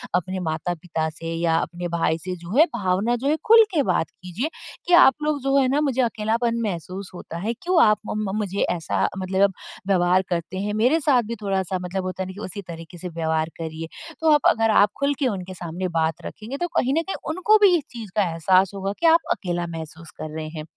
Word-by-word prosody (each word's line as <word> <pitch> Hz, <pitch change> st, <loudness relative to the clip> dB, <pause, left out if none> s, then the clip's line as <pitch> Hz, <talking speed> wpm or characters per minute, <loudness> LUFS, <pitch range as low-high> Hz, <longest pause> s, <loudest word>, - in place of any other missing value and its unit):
अपने 185 Hz, +1 st, -1 dB
माता-पिता 165 Hz, -1 st, -2 dB
से 165 Hz, +1 st, -6 dB
या 165 Hz, 0 st, +1 dB
अपने 175 Hz, +1 st, -3 dB
भाई 160 Hz, -1 st, +1 dB
से 185 Hz, -1 st, -3 dB
जो 175 Hz, +5 st, -7 dB
है 320 Hz, -, +8 dB
भावना 195 Hz, +5 st, +1 dB
जो 250 Hz, +3 st, -3 dB
है 300 Hz, -, +3 dB
खुल 455 Hz, 0 st, +9 dB
के 300 Hz, -5 st, +2 dB
बात 160 Hz, -, +1 dB
कीजिए 185 Hz, -, -5 dB, 0.4 s
कि 355 Hz, -, +2 dB
आप 265 Hz, -, +7 dB
लोग 300 Hz, -2 st, 0 dB
जो 275 Hz, 0 st, +1 dB
है 265 Hz, -, +4 dB
ना 290 Hz, +3 st, +2 dB
मुझे 265 Hz, -3 st, +1 dB
अकेलापन 230 Hz, 0 st, 0 dB
महसूस 185 Hz, -1 st, -4 dB
होता 170 Hz, -2 st, -8 dB
है। 215 Hz, +7 st, -2 dB
क्यों 345 Hz, +7 st, +2 dB
आप 215 Hz, -1 st, +4 dB
मम 210 Hz, -2 st, -2 dB
मुझे 200 Hz, -2 st, -2 dB, 0.2 s
ऐसा 165 Hz, -1 st, 0 dB
मतलब 190 Hz, +1 st, +1 dB, 0.3 s
व्यवहार 185 Hz, -1 st, +3 dB
करते 175 Hz, +1 st, -3 dB
हैं। 210 Hz, +1 st, -2 dB
मेरे 250 Hz, +10 st, +3 dB
साथ 275 Hz, -5 st, +3 dB
भी -, -, -2 dB
थोड़ा-सा 190 Hz, -2 st, -1 dB
मतलब 180 Hz, +1 st, -3 dB
होता 185 Hz, 0 st, -3 dB
है -, -, -6 dB
ना 190 Hz, -, -7 dB
कि 200 Hz, -, -11 dB
उसी 200 Hz, +2 st, -6 dB
तरीके 165 Hz, 0 st, -9 dB
से 180 Hz, +1 st, -6 dB
व्यवहार 160 Hz, -1 st, -1 dB
करिए। 160 Hz, 0 st, -5 dB, 0.3 s
तो 320 Hz, -1 st, +4 dB
आप 295 Hz, -, +4 dB
अगर 225 Hz, 0 st, +2 dB
आप 205 Hz, -, +5 dB
खुल 280 Hz, +1 st, +2 dB
के 270 Hz, -, +2 dB
उनके 190 Hz, -5 st, -4 dB
सामने 175 Hz, +1 st, -4 dB
बात 160 Hz, 0 st, 0 dB
रखेंगे 230 Hz, +6 st, -7 dB
तो 350 Hz, -, -1 dB
कहीं 265 Hz, +2 st, +2 dB
न -, -, +1 dB
कहीं -, -, -2 dB
उनको 370 Hz, +7 st, +4 dB
भी 370 Hz, -3 st, +6 dB
इस 305 Hz, -, -5 dB
चीज़ 225 Hz, -6 st, -8 dB
का 200 Hz, -4 st, +2 dB
एहसास 185 Hz, +3 st, +3 dB
होगा 195 Hz, +1 st, -3 dB
कि 335 Hz, -, -1 dB
आप 330 Hz, +1 st, +7 dB
अकेला 175 Hz, -2 st, -2 dB
महसूस 160 Hz, +1 st, -9 dB
कर 155 Hz, 0 st, -6 dB
रहे 155 Hz, -1 st, -4 dB
हैं। 155 Hz, -, -4 dB
190 Hz, 225 wpm, -23 LUFS, 170-240 Hz, 0.4 s, खुल